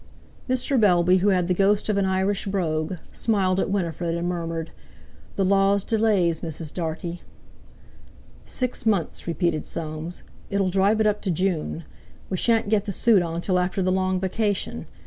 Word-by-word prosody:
Mr. 255 +1 +1
Bellby, 180 -3 +4
who 190 +2 +1
had 180 -3 +2
the 180 - +2
ghost 200 +3 +2
of 210 - +1
an 200 -1 +2
Irish 190 +1 0
brogue, 165 -3 -1 0.2
smiled 195 -4 +1
at - - 0
Winifred 170 -3 -1
and 170 +1 -2
murmured: 165 -2 -3 0.6
"The 195 - +1
Law's 195 +1 +3
delays, 205 -8 +2
Mrs. 160 -2 -5
Dartie." 170 +1 -4 1.2
"Six 250 -2 -3
months!" 195 -7 0
repeated 170 -2 -1
Soames; 160 +1 -5 0.3
"it'll 195 -2 0
drive 200 +4 +3
it - - +2
up 210 0 +1
to 195 - -2
June! 170 -2 -1 0.5
We 185 - 0
shan't 225 +2 +2
get 210 -2 +2
the 205 - -3
suit 210 0 +4
on 170 0 -3
till 185 0 +1
after 180 +1 -1
the 185 - +1
long 185 0 +1
vacation. 190 - -1
185 Hz, 165 wpm, -24 LUFS, 170-200 Hz, 1.2 s, Bellby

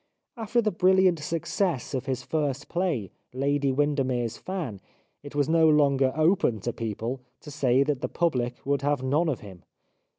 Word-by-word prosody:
After 230 +1 0
the 215 - +1
brilliant 185 -1 +4
success 165 -1 -2
of 130 0 -3
his 130 -2 -2
first 145 -3 -2
play, 165 - -1
" - - -45
Lady 140 +1 +1
Windermere's 130 -5 0
Fan," 155 - -5 0.4
it 145 0 -11
was 145 -1 +2
no 160 0 +4
longer 140 -3 +3
open 155 - +2
to 120 - -3
people 115 +3 -4 0.2
to 150 - -10
say 135 -2 +3
that 140 -2 -1
the - - -2
public 125 -8 -1
would 140 -1 +1
have 145 -2 0
none 150 +6 +1
of 135 - -2
him. 95 -4 -11
145 Hz, 170 wpm, -26 LUFS, 130-165 Hz, 0.4 s, brilliant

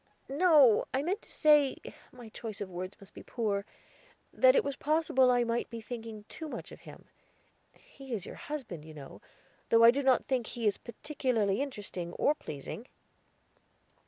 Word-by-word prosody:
"No; 285 - +5
I 270 - 0
meant 380 +7 -1
to - - -18
say 295 -3 +4 0.3
my 245 -3 -12
choice 220 -1 -7
of 195 -2 -5
words 185 +2 -6
must 200 - -15
be - - -10
poor 210 -4 -2 0.7
that - - +5
it - - +4
was 280 - -3
possible 295 -4 +2
I 245 -1 +3
might 235 0 -2
be 230 - -6
thinking 225 -2 -8
too 320 - -8
much - - -7
of - - -11
him; - - -13 0.7
he 270 -1 -14
is 205 -6 -3
your - - -8
husband, 250 - -7
you 155 0 -12
know, 140 -2 -11 0.5
though 230 0 +5
I 230 - +10
do 280 +3 -1
not 265 -2 +3
think 250 -4 -1
he 235 -2 -5
is 205 - +1
particularly 235 -5 -1
interesting, 205 -10 -5
or 295 - +2
pleasing." 215 - -8
240 Hz, 175 wpm, -31 LUFS, 210-280 Hz, 0.7 s, I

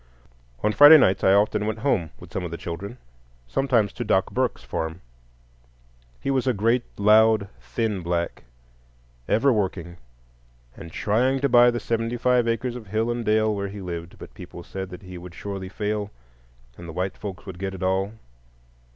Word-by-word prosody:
On 105 - +3
Friday 145 +5 +10
nights 95 -9 +3
I 95 - +5
often 105 +1 +2
went 110 0 -2
home 85 - +1
with - - -13
some 95 - -2
of 90 - -4
the 85 - -6
children,—sometimes 85 - -3
to 120 - -4
Doc 95 -4 +1
Burke's 130 -1 -1
farm. 80 +2 -4 1.2
He 135 - -2
was 130 -1 0
a 130 - +2
great, 115 +5 +2 0.2
loud, 110 0 +4
thin 95 - -2
Black, 85 0 -2 0.9
ever 130 +5 +3
working, 90 -5 -2 0.8
and 85 - -10
trying 125 +9 +1
to 140 - +2
buy 120 0 +7
the 120 0 -1
seventy 115 +1 -2
five 125 0 +2
acres 120 +1 -1
of 115 -4 -9
hill 110 +4 0
and 120 0 -3
dale 110 0 +2
where 100 -1 -3
he 100 +1 -8
lived; 85 -2 -6
but - - -11
people - - -10
said 95 -1 -6
that 90 +2 -10
he 90 -1 -9
would 90 -1 -11
surely 95 -1 -6
fail, 105 +1 -3 0.7
and 85 -1 -9
the - - -7
"white 95 +2 -2
folks 100 -3 -8
would 95 -3 -9
get 95 0 -4
it 95 - -7
all." 95 +2 0
100 Hz, 175 wpm, -24 LUFS, 90-115 Hz, 1.2 s, Friday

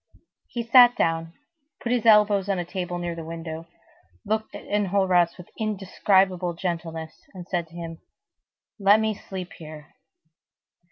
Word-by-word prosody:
He 235 - -4
sat 245 +1 +7
down, 165 0 0 0.5
put 235 - -3
his 240 -2 +1
elbows 210 -2 +5
on 195 - +1
a 175 - -3
table 175 -1 -4
near 175 -1 -3
the 165 -1 -7
window, 165 0 -7 0.6
looked 220 +1 -2
at - - -8
Enjolras 190 -4 +2
with 180 - -13
indescribable 190 -3 +1
gentleness, 165 -2 -5
and 180 -1 -9
said 175 -3 -2
to 165 - -17
him:— 165 -1 -7 0.8
"Let 200 +2 +5
me 220 0 0
sleep 190 -3 -8
here." 155 -2 -11
180 Hz, 145 wpm, -25 LUFS, 165-205 Hz, 0.8 s, sat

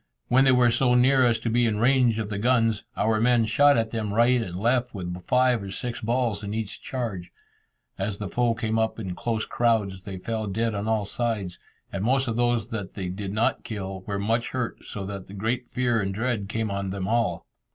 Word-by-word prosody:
When 130 +2 +5
they 130 - +6
were 125 -2 +5
so 125 +1 +3
near 130 +1 +5
as 115 -1 +2
to 115 - -1
be 120 +1 +3
in 105 -2 0
range 125 -1 +3
of 110 -2 -3
the 100 -2 -3
guns, 115 -2 +2
our 110 0 +2
men 120 -1 +4
shot 145 +5 +5
at 115 -1 0
them 110 -3 -2
right 120 +2 +4
and 90 -6 -5
left 120 +4 0
with 90 -1 -5
five 125 -2 +3
or 100 - -6
six 120 +5 -4
balls 115 -2 0
in 100 +1 -4
each 110 -2 -4
charge. 110 -9 -4 0.7
As 100 +1 -2
the 100 - -4
foe 120 +2 +1
came 110 -1 -1
up 110 0 0
in 95 -5 -4
close 110 +3 -2
crowds, 105 -6 0
they 95 -1 -7
fell 110 +3 -3
dead 115 +3 -1
on 100 +1 -3
all 110 -2 +1
sides, 100 -5 -3 0.3
and 100 0 -2
most 130 +3 +2
of 115 - -1
those 120 -2 +1
that 105 -5 -5
they 95 -3 -3
did 95 +1 -5
not 110 +3 0
kill 95 -3 -5
were 100 -2 -2
much 115 +4 0
hurt, 125 -2 -4
so 100 -2 -6
that 100 0 -7
great 120 +4 -2
fear 120 -3 +1
and 95 -1 -2
dread 110 -3 -1
came 110 -1 -2
on 100 -1 -2
them 95 0 -3
all. 115 -6 0
110 Hz, 220 wpm, -25 LUFS, 100-120 Hz, 0.7 s, they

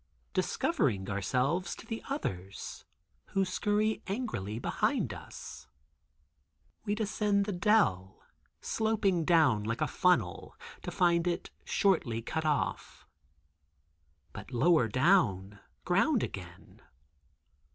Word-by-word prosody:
Discovering 95 0 0
ourselves 125 - 0
to - - -12
the 225 0 -5
others, 95 - -5 0.5
who 195 -1 +2
scurry 210 +3 0
angrily 195 - -3
behind 120 - 0
us, - - -10 1.2
we 205 - 0
descend 210 -1 +1
the 205 - -2
dell, 175 - +2 0.4
sloping 210 -6 +1
down 150 -11 +4
like 115 +2 -2
a - - +2
funnel, 125 - +1 0.3
to - - -5
find 170 -1 +2
it 175 - -2
shortly 160 - +1
cut 160 +7 -3
off. 150 -2 -2 1.3
But - - -9
lower 135 +1 +3
down—ground 130 - +1
again. 90 -2 -8
170 Hz, 100 wpm, -31 LUFS, -, 1.3 s, down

